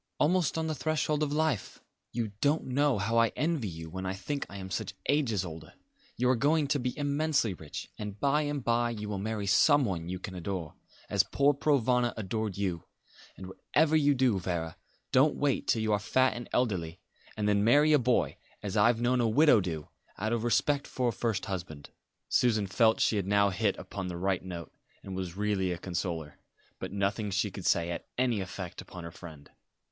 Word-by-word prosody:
Almost 170 0 +2
on 160 - 0
the 160 - -1
threshold 150 +1 0
of 150 -2 0
life. 150 -8 -1 0.3
You 115 -2 -2
don't 145 +3 +2
know 140 0 +2
how 115 +4 +1
I 115 - +5
envy 155 -7 0
you 80 -2 -7
when 95 +3 -6
I 95 0 -2
think 140 +9 -4
I 100 - -8
am 95 -1 -7
such 100 -1 -3
ages 115 -10 +1
older. 80 -2 -9 0.4
You 125 - +2
are - - +3
going 150 +5 +2
to 145 - +2
be 125 +2 -3
immensely 145 -6 +1
rich; 80 -4 -8
and 105 -1 -6
by 140 +4 +2
and 145 -3 -2
by 120 0 +2
you 105 -2 -5
will 100 -2 -3
marry 105 0 -3
someone 100 - +3
you 90 - -3
can 95 +1 -7
adore, 90 -3 -4 0.3
as - - +3
poor 140 +1 +2
Provana 125 -4 +2
adored 110 -1 -3
you: 90 -5 -2 0.5
and 95 - -8
whatever 150 +11 +1
you 145 -2 +4
do, 125 -6 +2
Vera, 85 -3 -3 0.4
don't 145 +3 +4
wait 145 -1 0
till 110 - +2
you 110 -1 +1
are 105 - +2
fat 130 +6 +2
and 120 0 -7
elderly, 90 -10 -1 0.4
and 105 -1 0
then 100 -1 +3
marry 145 +7 +5
a 150 - +6
boy, 125 0 +1 0.3
as 100 -1 -4
I've 115 +2 +4
known 125 +1 +2
a 115 - +2
widow 140 -2 +5
do 80 -5 -4 0.3
out 110 +3 -1
of 115 -1 -1
respect 140 +4 +1
for 125 -2 0
a - - -2
first 110 -3 -1
husband." 85 -6 -6 0.4
Susan 110 -4 +2
felt 110 +3 +3
that - - +2
she 110 - +2
had 95 -2 -1
now 100 0 +3
hit 100 +1 0
upon 95 -2 -6
the 90 -1 -5
right 95 0 0
note, 85 -3 -7 0.3
and 95 - -6
was 95 -1 -5
really 100 -3 0
a 90 - -2
consoler; 85 -4 -4 0.4
but - - -5
nothing 100 +1 -1
she 100 +1 0
could 95 -1 -5
say 85 0 +2
had 85 - -4
any 120 -5 +1
effect 95 -1 -6
upon 90 -1 -10
her 85 - -7
friend. 80 -4 -12
110 Hz, 205 wpm, -30 LUFS, 95-130 Hz, 0.5 s, a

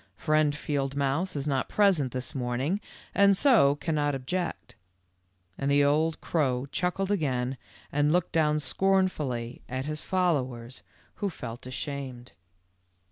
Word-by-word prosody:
Friend 155 -2 +2
Field 140 -2 -2
mouse 145 +6 0
is 140 -1 -2
not 135 -3 0
present 185 -11 +3
this 130 0 -4
morning 130 +9 -1 0.3
and 200 0 +5
so 215 - +5
cannot 145 -2 0
object 135 -2 -4 0.4
;" 90 0 -43
and 140 - 0
the 145 0 +4
old 155 +3 +2
crow 130 -6 0
chuckled 185 +2 -1
again 135 -8 0 0.4
and 145 +1 +2
looked 180 +1 +1
down 150 -2 +2
scornfully 150 -7 0
at 130 +2 -3
his 155 0 -4
followers, 130 -10 -1 0.4
who 200 - -1
felt 120 -7 -8
ashamed. 130 -1 -5
145 Hz, 135 wpm, -28 LUFS, 130-165 Hz, 0.4 s, and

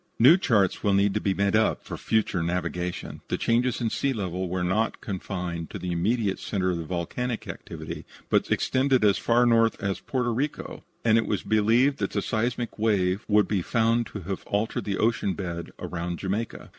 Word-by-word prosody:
New 130 +9 +8
charts 115 - +2
will 100 -2 +2
need 100 0 +3
to 105 - -1
be 95 -1 0
made 100 0 +1 0.3
for - - -7
future 110 -5 0
navigation. 90 +1 -3
The - - -1
changes 120 +1 +1
in 115 -3 -1
sea 140 -1 0
levels 95 -4 -3
were 90 0 -1
not 105 +6 0
confined 90 -4 -4
to - - -6
the 90 - -4
immediate 100 +3 0
centre 95 -3 -1
of 85 - -2
volcanic 110 +8 -3
activity, - - -7 0.2
but - - +2
extended 130 -3 +2
as 100 -2 +4
far 120 +1 +3
north 115 -1 +3
as 100 -2 -2
Porto 125 -3 -1
Rico, 140 +6 -3 0.2
and 115 0 +5
it 115 - -2
was - - -1
believed 115 +6 +3
that - - -2
the - - 0
seismic 120 0 -2
wave 100 -2 +1
would 105 -1 +4
be 100 -3 0
found 115 +3 +1
to 100 - -7
have 95 +2 -5
altered 105 0 -1
the 100 -2 -1
ocean 110 -3 +1
bed 85 -3 -5
round 85 0 -4
Jamaica. 100 +4 -4
105 Hz, 185 wpm, -26 LUFS, 95-115 Hz, 0.3 s, New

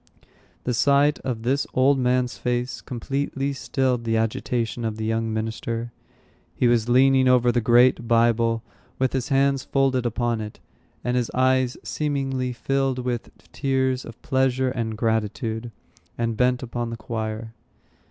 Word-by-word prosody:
The 125 - -1
sight 140 +4 +3
of 115 -4 -4
this 135 +4 0
old 135 +1 +4
man's 125 0 +1
face 125 0 -2
completely 135 +2 -3
stilled 130 -2 -1
the 115 -1 +1
agitation 115 +1 -1
of 110 -1 -2
the 110 - -3
young 115 0 -1
minister. 115 +2 -3 0.6
He 125 - +2
was 120 -1 +2
leaning 130 +1 +5
over 125 -1 +4
the 120 - +1
great 120 +1 +4
Bible, 115 0 +2 0.3
with 130 -1 0
his 130 -2 -1
hands 135 -1 +2
folded 135 -3 +1
upon 120 -1 -1
it, 105 0 -8 0.4
and 125 - 0
his 125 -2 0
eyes 130 0 +2
seemingly 135 -4 -2
filled 135 +1 -1
with 125 -2 -3 0.2
tears 130 -2 0
of 115 - -11
pleasure 130 -1 +1
and 115 -3 -3
gratitude, 110 +1 -1 0.5
and 115 -1 -1
bent 125 +2 +1
upon 120 -1 -3
the 115 - -5
choir. 110 0 -5
125 Hz, 145 wpm, -24 LUFS, 115-130 Hz, 0.6 s, leaning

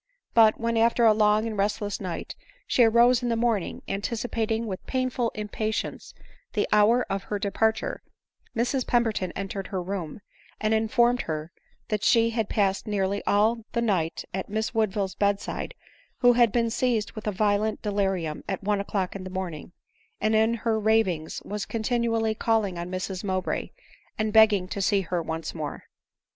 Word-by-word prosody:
But 220 -2 +5
when, 230 0 0
after 230 +1 +3
a 220 - +7
long 210 0 +3
and 225 -1 -3
restless 205 +1 -1
night, 180 -3 -5 0.3
she 245 - +3
arose 235 +2 +5
in 245 - -1
the 230 - +1
morning, 225 -5 -1
anticipating 225 +2 -2
with 190 -4 -5
painful 255 -2 0
impatience 215 +1 -4 0.4
the 210 - +1
hour 220 +4 +4
of 195 0 -3
her 210 - -2
departure, 220 +2 0 0.5
Mrs 245 +3 0
Pemberton 225 -6 +1
entered 195 0 -4
her 190 - -3
room, 180 -2 -4 0.4
and 215 0 +1
informed 235 +2 +3
her 155 +1 -3 0.4
that 210 -3 -1
she 230 0 +4
had 225 -2 -1
passed 195 -1 0
nearly 200 -1 0
all 220 +3 +3
the 235 - +1
night 180 -8 0
at 190 +1 -4
Miss 220 +3 -2
Woodville's 205 -4 0
bed 200 0 +1
side, - - -5 0.5
who 245 -1 +7
had 240 -2 +4
been 230 0 +1
seized 235 -3 0
with 215 -1 -8
a - - +2
violent 210 +2 0
delirium 195 -7 -1
at 195 0 -3
one 205 0 +1
o'clock 195 -2 -2
in 195 - -6
the 185 - -6
morning, 180 -4 -5 0.5
and 215 +1 +1
in 220 +2 +3
her 225 -1 0
ravings 210 -7 +1
was 210 0 -4
continually 230 -1 0
calling 220 -4 0
on 175 +1 -5
Mrs 185 +1 -4
Mowbray, 185 -2 -2 0.5
and 215 -1 -1
begging 215 -4 +5
to 200 - -3
see 195 0 +2
her 175 -1 -2
once 160 0 -4
more. 155 -3 -5
215 Hz, 170 wpm, -26 LUFS, 195-230 Hz, 0.5 s, a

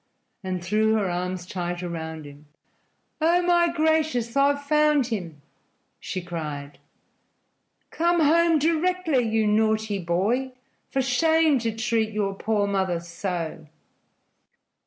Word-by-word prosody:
and 185 -2 -3
threw 215 +3 +2
her 210 -3 0
arms 180 0 -3
tight 175 -1 -4
around 160 -2 -5
him. 145 +1 -14 0.7
"Oh, 345 +3 +3
my 345 -1 +3
gracious, 310 -7 0
I've 285 +1 +2
found 300 -1 +3
him!" 175 - -5 0.6
she 185 - -5
cried. 150 -5 -6 1.1
"Come 345 +1 +1
home 330 +2 +4
directly, 330 -1 +1
you 220 0 +1
naughty 215 -1 +1
boy! 205 +10 -1 0.4
For 270 - 0
shame, 315 +3 +3
to 225 -2 -2
treat 225 -1 0
your 200 -2 -1
poor 205 +1 0
mother 190 -3 0
so!" 170 -2 -5
220 Hz, 115 wpm, -25 LUFS, -, 1.1 s, home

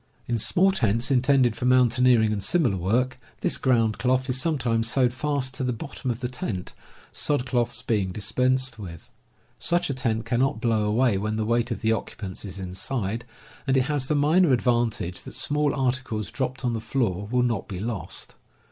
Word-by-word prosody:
In 115 -1 0
small 190 - +3
tents 115 - 0
intended 130 -2 +3
for - - -4
mountaineering 125 -3 +4
and 100 - -2
similar 125 - +2
work, 125 +8 0 0.2
this - - +1
ground 115 -5 +2
cloth 130 +1 +1
is 130 +1 0
sometimes 120 -8 0
sewed 125 -1 +2
fast 140 -1 -1
to 130 - -4
the 125 - 0
bottom 140 +1 -6
of 120 0 -3
the 125 - -1
tent, 110 -7 -5 0.4
sod 145 -4 0
cloths 120 -1 -1
being 105 -6 0
dispensed 130 +4 0
with. 85 -5 -9 0.5
Such 175 -4 0
a - - -1
tent 115 -4 -1
cannot 120 0 +1
blow 115 -3 +1
away 110 -1 +2
when 110 +2 -2
the 110 0 -1
weight 120 +1 +1
of 115 - -4
the 110 - +2
occupants 100 -4 -4
is 95 -1 -5
inside, 100 +4 -3 0.4
and 135 0 +3
it 130 - +4
has 140 -1 -1
the 150 - +1
minor 155 +3 +4
advantage 120 -7 0
that - - -9
small 150 0 +1
articles 125 - -1
dropped 130 0 -3
on 120 - +1
the 115 - -3
floor 110 -5 -1
will 125 +1 +2
not 115 -5 -1
be 95 - -6
lost. 110 -1 -4
120 Hz, 185 wpm, -25 LUFS, 110-130 Hz, 0.5 s, mountaineering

